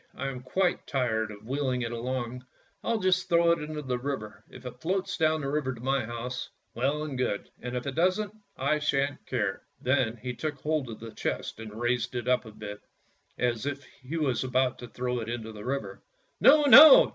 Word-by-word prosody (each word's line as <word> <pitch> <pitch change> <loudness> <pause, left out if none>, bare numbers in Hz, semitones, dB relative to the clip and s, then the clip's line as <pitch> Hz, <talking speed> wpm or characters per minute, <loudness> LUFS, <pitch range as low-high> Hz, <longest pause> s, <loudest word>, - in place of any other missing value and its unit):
I 135 +1 -3
am 130 -2 -6
quite 175 +8 0
tired 115 -6 0
of 105 0 -11
wheeling 130 -1 -1
it 115 - -3
along; 125 +1 -3 0.4
I'll 230 - +1
just 185 -3 +1
throw 170 0 +5
it 170 - +1
into 150 0 -5
the 125 -2 -2
river; 125 -5 -5
if 130 0 -13
it 125 0 -8
floats 185 +3 -1
down 155 -1 +2
the 135 - -3
river 140 -2 -1
to - - -12
my 135 +1 0
house, 120 +2 -5 0.2
well 140 +6 0
and 150 -3 -4
good, 100 -5 -2
and 125 0 -5
if 125 - -4
it 140 - -3
doesn't, 185 +6 +1 0.2
I 155 - +1
shan't 145 -1 0
care." 105 -6 -1 0.2
Then 125 -3 +1
he 125 +2 -5
took 150 +4 -3
hold 150 -2 -1
of 110 - -7
the 115 0 -8
chest 105 - -3
and 110 -1 -8
raised 120 0 0
it 120 0 -3
up 125 -1 +2
a 110 - -9
bit, 105 -1 -8 0.6
as 120 +1 0
if 140 0 -3
he 130 +4 -8
was 135 -7 0
about 130 0 +1
to 120 - -8
throw 125 +1 -2
it 115 0 -5
into 115 -2 -4
the 105 -1 -9
river. 135 +3 -3 0.2
" - - -43
No, 300 +1 +7
no! 285 +1 +11
130 Hz, 215 wpm, -28 LUFS, 120-150 Hz, 0.6 s, no